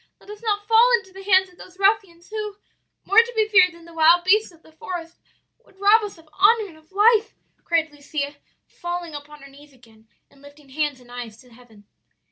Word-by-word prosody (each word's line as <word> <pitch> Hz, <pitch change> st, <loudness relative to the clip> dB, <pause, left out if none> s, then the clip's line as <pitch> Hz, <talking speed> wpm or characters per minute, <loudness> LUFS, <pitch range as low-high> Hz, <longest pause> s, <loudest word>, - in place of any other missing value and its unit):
let 410 Hz, -, -14 dB
us 420 Hz, +1 st, -11 dB
not 415 Hz, -2 st, -2 dB
fall 455 Hz, +2 st, +5 dB
into 385 Hz, -4 st, -14 dB
the 385 Hz, -, -11 dB
hands 380 Hz, -1 st, +4 dB
of 360 Hz, -1 st, -23 dB
those 370 Hz, 0 st, -14 dB
ruffians, 390 Hz, -4 st, 0 dB
who 425 Hz, -2 st, -5 dB, 0.5 s
more 410 Hz, -, +5 dB
to 470 Hz, +1 st, +3 dB
be 435 Hz, -1 st, +2 dB
feared 380 Hz, -4 st, +5 dB
than 335 Hz, 0 st, -17 dB
the 335 Hz, -, -15 dB
wild 330 Hz, +2 st, +4 dB
beasts 420 Hz, +3 st, +2 dB
of 330 Hz, -1 st, -23 dB
the 315 Hz, -, -20 dB
forest 340 Hz, -2 st, -8 dB, 0.5 s
would 385 Hz, -, -26 dB
rob 415 Hz, +3 st, +5 dB
us 415 Hz, -3 st, -7 dB
of 325 Hz, -1 st, -20 dB
honor 415 Hz, +4 st, +3 dB
and 325 Hz, -, -16 dB
of 315 Hz, +3 st, -25 dB
life!' 435 Hz, +2 st, +3 dB, 0.3 s
cried 325 Hz, -2 st, 0 dB
Lucia, 290 Hz, 0 st, -5 dB, 0.3 s
falling 345 Hz, -2 st, -6 dB
upon 295 Hz, 0 st, -11 dB
her -, -, -12 dB
knees 285 Hz, +1 st, -18 dB
again, 225 Hz, -3 st, -23 dB, 0.2 s
and 275 Hz, -, -23 dB
lifting 285 Hz, 0 st, -17 dB
hands 295 Hz, -1 st, -2 dB
and 245 Hz, -1 st, -18 dB
eyes 240 Hz, -3 st, -8 dB
to 250 Hz, -1 st, -20 dB
heaven. 225 Hz, -4 st, -19 dB
345 Hz, 215 wpm, -22 LUFS, 295-410 Hz, 0.5 s, fall